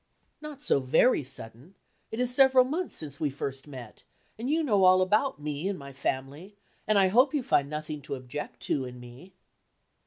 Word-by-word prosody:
"Not 300 -2 -9
so - - +3
very 145 - +3
sudden; 125 - -7 0.3
it 220 - -6
is 250 0 +1
several 265 -1 +6
months 325 +7 -3
since 145 -3 -6
we 150 - 0
first 135 0 -6
met, 130 -6 -10 0.3
and 235 +4 -5
you 320 +2 +1
know 205 -9 +2
all 185 0 +6
about 210 - +1
me, 150 +3 -4
and 200 -1 -2
my 140 -1 -10
family, 140 +8 -4 0.3
and 215 0 +3
I 190 -1 +4
hope 255 +8 +4
you 280 - 0
find 140 -10 +1
nothing 150 0 -5
to 140 - -3
object 130 +3 -7
to 135 -3 -1
in 125 0 -9
me." 125 +10 -13
160 Hz, 190 wpm, -28 LUFS, -, 0.3 s, several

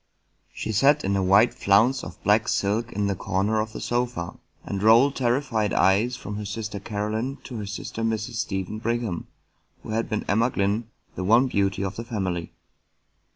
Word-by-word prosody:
She - - -4
sat 140 +7 +4
in 100 - 0
a 100 - +1
wide 100 +5 +5
flounce 115 +7 +3
of - - -9
black 105 +2 +3
silk 110 +4 0
in 105 +1 -1
the 100 - +1
corner 100 +4 0
of 110 +1 -2
the - - -7
sofa, 120 -8 -2 0.3
and 100 -1 -3
rolled 115 +6 +5
terrified 120 -4 0
eyes 105 +6 +3
from 105 -4 -6
her 105 - -5
sister 105 0 -4
Caroline 110 +6 -3
to 125 - -7
her 105 -2 -5
sister 105 +2 -5
Mrs. 110 0 -2
Stephen 105 -3 -3
Brigham, 115 -6 -2 0.6
who - - -9
had 115 +1 -1
been 110 - -2
Emma 115 +4 +2
Glynn, 105 +2 -1 0.2
the 90 - -4
one 115 +7 +5
beauty 100 -5 0
of 95 0 -4
the 115 - -4
family. 95 -7 -3
110 Hz, 180 wpm, -25 LUFS, 100-120 Hz, 0.6 s, wide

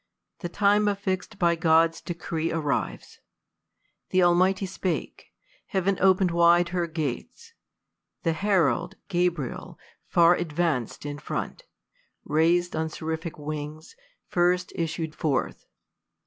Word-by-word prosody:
The 175 - -4
time 205 +3 +3
affix'd 195 0 -2
by 170 -2 +3
God's 165 0 +3
decree 165 -2 -3
arrives. 145 - -3 0.9
Th' 185 0 +3
Almighty 185 +3 +3
spake: 185 -2 -4 0.4
heav'n 195 -1 0
open'd 185 -1 +4
wide 170 +1 +4
her 175 -1 -1
gates. 170 - -5 0.7
The 165 - +1
herald, 175 - +1
Gabriel, 175 -7 -2 0.3
far 170 +1 +5
advanc'd 155 -8 -2
in 145 0 -5
front, - - -5 0.6
Rais'd 170 +3 +2
on 160 0 -1
seraphic 160 +1 -5
wings, 150 +1 -6 0.3
first 180 +1 +1
issued 160 -1 -3
forth. 150 -4 -2
170 Hz, 105 wpm, -26 LUFS, 160-185 Hz, 0.9 s, far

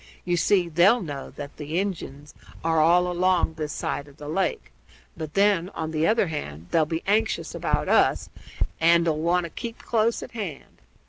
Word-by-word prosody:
You 175 -1 +1
see, 180 +1 +2
they'll 180 +8 +4
know 145 -4 -6
that 145 -1 -8
the 150 +2 -4
Injuns 160 -7 -4 0.3
are 160 0 +2
all 175 +3 +5
along 180 -1 +1
this 155 -1 -4
side 145 0 -3
of 140 0 -17
the 150 - -9
lake; 165 - -2 0.4
but 155 -2 -7
then, 195 -3 +3
on 160 -1 -3
the 155 0 +1
other 220 -1 +3
hand, 85 - -6
they'll 160 -2 +3
be 160 +1 -3
anxious 220 +2 0
about - - -1
us - - +3 0.5
and 170 +1 +4
'll 155 -2 +1
want 175 +2 +2
to 170 - -6
keep 235 +4 -6
close 230 0 0
at - - -9
hand. 195 - -7
170 Hz, 185 wpm, -25 LUFS, 155-190 Hz, 0.5 s, all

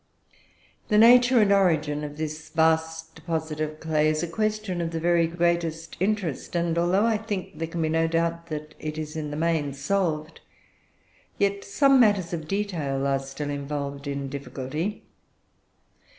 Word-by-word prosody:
"The 210 - +2
nature 245 +2 +7
and 205 -1 +3
origin 155 -6 +2
of 150 0 -6
this 155 0 -5
vast 160 0 +1
deposit 160 -1 -4
of 155 0 -3
clay 155 -1 +1
is 155 +2 0
a - - -1
question 215 0 -2
of 165 - -1
the 165 -1 -3
very 170 0 +3
greatest 170 -1 -1
interest; 190 -6 -1
and 170 -1 +1
although 175 +5 +2
I 225 -2 +2
think 205 -7 -5
there 165 - -2
can 165 0 -3
be 155 - 0
no 165 +1 +2
doubt 170 0 -1
that 155 -1 -6
it 155 0 -5
is 155 -1 -5
in 155 -2 -3
the 145 - -5
main 160 -3 0
solved, 155 +1 -2 1.0
yet 200 0 0
some 275 +6 +4
matters 205 -7 +3
of 160 -2 -4
detail 165 -9 -2
are 135 -1 +2
still 135 +2 -5
involved 140 0 -4
in 140 -1 -3
difficulty. 140 +7 -4
165 Hz, 165 wpm, -25 LUFS, 150-185 Hz, 1.0 s, nature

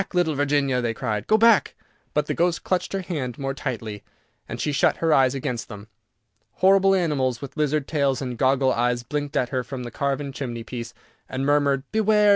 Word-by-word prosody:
little 175 -3 +2
Virginia," 140 -2 +1
they 115 -1 -1
cried, 105 -5 -3
"go 215 - +5
back!" 230 -1 +4 0.4
but 150 0 +2
the - - -2
ghost 175 0 0
clutched 185 -1 -1
her 195 -1 -2
hand 135 -9 -4
more 135 -1 -3
tightly, 115 -7 -5 0.5
and - - -5
she 150 - 0
shut 140 - +2
her 165 -2 +2
eyes 130 -1 +4
against 125 -3 -3
them. 105 -1 -9 0.7
Horrible 195 +1 +4
animals 140 -9 0
with 140 - -8
lizard 150 -2 0
tails 140 -4 +1
and 125 -3 -4
goggle 130 +1 +2
eyes 120 0 0
blinked 145 +2 -3
at 125 - +1
her 130 -2 -1
from 125 0 -6
the 120 - -7
carven 140 +2 -2
chimneypiece, 120 -3 -6 0.4
and 130 +1 -2
murmured, 140 -2 +2
"Beware! 215 -1 +4
140 Hz, 190 wpm, -24 LUFS, 125-155 Hz, 0.7 s, go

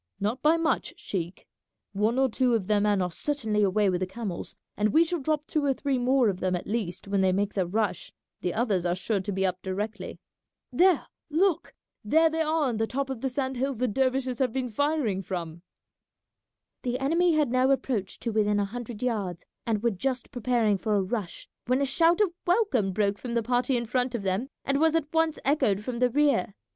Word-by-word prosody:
"Not 215 +6 -1
by 315 +2 +4
much, 330 -1 -1
sheik; 175 -2 -5 0.5
one 215 +5 +1
or 265 0 +4
two 250 0 +1
of 210 -5 -1
their 210 +1 +2
men 205 -2 +2
are 180 - -2
certainly 220 - -1
away 205 +1 +3
with 180 -2 +1
the 185 - 0
camels, 195 -3 -6 0.2
and 210 +1 +1
we 320 - +6
shall 340 +1 -2
drop 300 +1 -1
two 305 -1 -1
or 275 -1 +2
three 275 -2 -1
more 255 0 +3
of 190 -3 -1
them 185 -1 0
at 175 - -4
least 200 -5 -3
when 200 -1 +1
they 190 -1 +3
make 200 +2 0
their 190 -3 0
rush; 210 +2 -1 0.3
the 180 - -1
others 210 -4 0
are 175 0 0
sure 200 +2 -1
to 190 +2 -4
be 190 0 0
up 185 0 -1
directly. 205 +1 -4 0.5
There, 360 -3 +4 0.2
look! 340 +3 +1 0.3
There 320 +9 +4
they 320 0 -1
are 315 0 +1
on 245 -5 0
the 225 0 0
top 270 +2 -2
of 250 -4 -5
the 265 - 0
sand 260 0 -2
hills 265 0 -1
the 250 +2 +1
dervishes 260 +1 0
have 260 -3 +1
been 250 -1 -3
firing 280 -6 0
from." 170 -3 -5 1.2
The 245 0 -1
enemy 330 +6 +2
had 300 -5 +2
now 255 +1 +3
approached 245 -8 -1
to 235 - -2
within 210 -1 +2
a 200 - +1
hundred 240 +1 -7
yards, 200 -8 -2 0.2
and 215 -2 0
were 235 - +3
just 250 +5 -3
preparing 235 -4 +1
for 215 0 0
a 200 - +2
rush 195 -2 -4 0.2
when 255 +2 +2
a 280 - +2
shout 335 +6 +3
of 385 -5 +2
welcome 350 - +2
broke 200 +1 0
from 240 -2 -5
the 235 - +1
party 245 +2 +1
in 235 - -2
front 250 +1 0
of 220 - -3
them 195 +7 -1 0.2
and 275 +1 +1
was 320 +1 +3
at 315 -2 -1
once 325 -1 +2
echoed 215 -8 +2
from 240 +1 -4
the 250 0 +3
rear. 275 -8 +1
235 Hz, 220 wpm, -27 LUFS, 200-275 Hz, 1.2 s, we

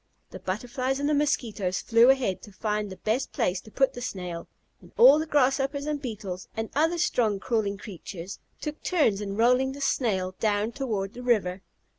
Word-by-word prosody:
The - - -8
Butterflies 250 +7 -2
and 285 - 0
the 300 - +2
Mosquitoes 230 -10 0
flew 230 +2 +5
ahead 250 -9 +2
to 210 - -12
find 210 +1 -2
the 190 - -7
best 220 +8 -1
place 180 +1 0
to 215 - -14
put 270 +4 +2
the 245 - -7
Snail, 180 -7 -5 0.3
and - - -17
all 470 -10 +8
the 315 - -2
Grasshoppers, 275 0 +1
and 300 -1 -2
Beetles, 200 -7 -6
and 225 0 -3
other 325 +4 +2
strong 225 - +1
crawling 210 -3 -1
creatures 190 -3 -8 0.2
took 300 0 -5
turns 285 - +2
in 200 -1 -4
rolling 250 +3 +3
the 280 - -9
Snail 190 -9 0
down 210 0 +1
toward 215 -7 -3
the 245 - -8
river. 200 -7 +1
230 Hz, 185 wpm, -27 LUFS, 200-270 Hz, 0.3 s, all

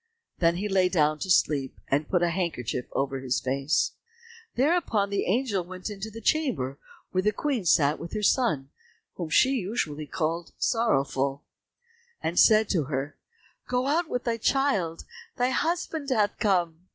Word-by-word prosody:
Then 170 -1 +3
he 200 +4 -2
lay 190 -2 +3
down 155 -4 +2
to 190 - -4
sleep, 145 -6 +2
and 145 +2 0
put 180 -2 +2
a 170 - +2
handkerchief 160 -9 -2
over 135 -1 -1
his 130 -1 -1
face. 135 +4 0 0.6
Thereupon 255 - +1
the 200 - 0
angel 205 -2 +1
went 185 +3 -7
into 205 +1 -6
the 225 +1 -10
chamber 215 - 0 0.3
where 185 - +1
the 210 +2 +2
Queen 250 -2 -2
sat 150 -2 +3
with 170 - -8
her 215 - -3
son, 155 - +1 0.4
whom 170 -3 -5
she 260 +11 +4
usually 180 - -2
called 165 0 -3
"Sorrowful," 140 - 0 0.8
and 165 +2 -1
said 215 -1 +6
to 165 -7 +1
her, 135 +1 -3 0.5
"Go 250 +1 0
out 315 +4 +1
with 245 - -2
thy 235 -2 -1
child, 220 -10 0 0.3
thy 250 0 +2
husband 320 0 -1
hath 210 -6 +1
come." 175 -4 0
185 Hz, 160 wpm, -27 LUFS, 155-230 Hz, 0.8 s, said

